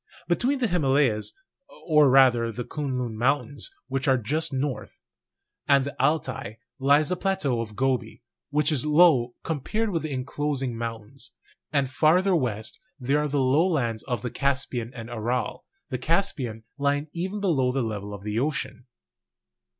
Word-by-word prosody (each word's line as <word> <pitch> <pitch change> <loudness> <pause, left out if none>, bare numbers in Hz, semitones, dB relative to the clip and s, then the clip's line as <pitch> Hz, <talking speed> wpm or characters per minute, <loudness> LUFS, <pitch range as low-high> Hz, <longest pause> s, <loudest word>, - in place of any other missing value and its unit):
Between 250 +11 +1
the 255 - 0
Llimalayas 135 - +1 0.5
(or 150 -4 +5
rather 125 -3 +5
the 120 +2 -5
Kuen 140 -1 -3
Lun 120 -3 -3
Mountains, 135 +3 0 0.2
which 135 +2 -2
are 130 -1 +5
just 150 +9 -1
north) 135 0 -3 0.7
and 140 -1 +4
the 140 - -5
Altai, 135 -7 -1 0.2
lies 145 +3 +4
the 180 - +1
plateau 180 -11 0
of 110 -2 -7
Gobi, 125 -3 -1 0.3
which 150 +1 +2
is 140 -5 +1
low 150 -6 +4
com 160 -4 -2
pared 220 - -1
with 165 -3 -1
the 155 0 -4
inclosing 135 -1 -2
mountains; 115 +2 -7 0.4
and 140 -3 +2
farther 175 +8 +3
west 115 -8 -2 0.2
there 135 +3 +1
are 150 - 0
the 145 0 -1
lowlands 135 - +2
of 120 -2 -2
the 125 - -3
Caspian 130 -4 -1
and 115 -2 -7
Aral, 120 +2 -2 0.2
the 130 - -3
Caspian 130 - -1 0.2
lying 145 +1 +1
even 185 +4 -3
below 145 -11 +2
the 130 0 0
level 105 -2 -4
of 100 -1 -8
the 105 +1 -1
ocean. 140 -2 -3
135 Hz, 160 wpm, -26 LUFS, 120-150 Hz, 0.7 s, or